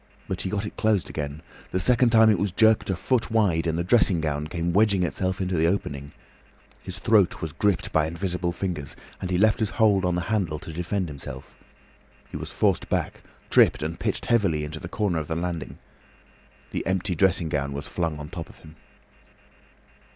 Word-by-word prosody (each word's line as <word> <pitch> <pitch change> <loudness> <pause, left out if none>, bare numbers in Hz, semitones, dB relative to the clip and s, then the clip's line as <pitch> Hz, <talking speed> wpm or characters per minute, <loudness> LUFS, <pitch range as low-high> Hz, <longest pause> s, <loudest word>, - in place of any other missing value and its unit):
But 90 -1 -3
he 95 - -3
got 105 +1 -2
it - - -8
closed 110 -4 +1
again. 75 +1 -5 0.3
The 95 - -1
second 120 +5 +4
time 110 -1 +6
it 100 - +1
was 100 -1 0
jerked 110 +3 +3
a 95 - +1
foot 125 +5 0
wide, 95 -7 +2
and 80 0 0
the 85 - 0
dressing 95 -2 +4
gown 75 -1 -2
came 85 +2 -2
wedging 100 -2 +3
itself 95 +1 -1
into 95 -1 -1
the 80 0 +3
opening. 70 -6 -2 0.7
His 95 0 -6
throat 105 -3 +3
was 80 - -4
gripped 100 +1 0
by 80 -1 +2
invisible 90 +1 -2
fingers, 85 -6 -4 0.3
and 90 - -3
he 90 - +1
left 110 +2 +3
his 110 -3 0
hold 105 -4 +3
on 90 -1 +1
the 90 - 0
handle 90 -5 -1
to 80 - -9
defend 90 +3 -2
himself. 70 -3 -9 0.8
He - - -8
was - - -5
forced - - +1
back, - - -2 0.3
tripped - - +5
and 80 +2 -4
pitched - - -2
heavily 95 -10 +2
into 75 +1 -6
the 85 - -8
corner 95 -5 0
of 75 - -5
the 80 - -2
landing. 85 -1 -4 0.9
The - - -2
empty 95 +1 0
dressing 90 -1 +2
gown 70 -2 -1
was 70 0 -5
flung 85 -3 -2
on 75 - -7
the 75 - -12
top 85 -2 -6
of - - -16
him. 80 0 -16
90 Hz, 200 wpm, -25 LUFS, 80-100 Hz, 0.9 s, time